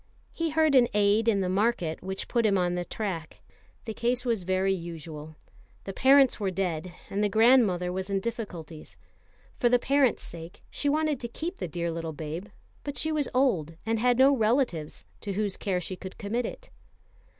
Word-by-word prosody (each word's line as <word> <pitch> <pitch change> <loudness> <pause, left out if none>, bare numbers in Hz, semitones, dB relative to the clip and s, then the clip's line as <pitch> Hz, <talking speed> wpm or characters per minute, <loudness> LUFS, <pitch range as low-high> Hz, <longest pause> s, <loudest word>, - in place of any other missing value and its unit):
He 330 -1 -1
heard 315 -1 +3
an 250 -3 +6
aside 210 +2 +3
in 205 -4 +3
the 185 - 0
market 190 -4 0
which 190 +1 -4
put 235 -2 +1
him 205 -3 +3
on 180 -1 +1
the 180 0 -1
track. 170 - -5 0.5
The 220 - -4
case 245 +3 0
was 230 -5 +1
very 190 +2 +1
usual. 160 -3 -7 0.5
The 195 - -6
parents 270 +2 +5
were 200 -2 0
dead, 180 -2 -2 0.2
and 205 +2 0
the 205 - +2
grandmother 215 -6 +4
was 190 +1 -3
in 195 -1 +1
difficulties. 185 -8 -6 0.6
For 240 - +3
the 245 - +5
parents' 270 0 +2
sake 165 0 -10
she 285 - -1
wanted 305 -2 +1
to 240 - -4
keep 335 +10 -5
the - - -4
dear 170 +1 -3
little 165 -1 -4
babe; 160 +5 -6 0.4
but 285 -1 -5
she 315 - 0
was 300 -3 0
old, 185 - +1
and 225 0 0
had 245 +1 +3
no 270 +2 +6
relatives 220 - 0
to 200 - -4
whose 205 -1 -1
care 190 -3 -1
she 180 +2 -5
could 185 +1 -9
commit 230 +4 -2
it. - - -10
200 Hz, 190 wpm, -28 LUFS, 180-245 Hz, 0.6 s, an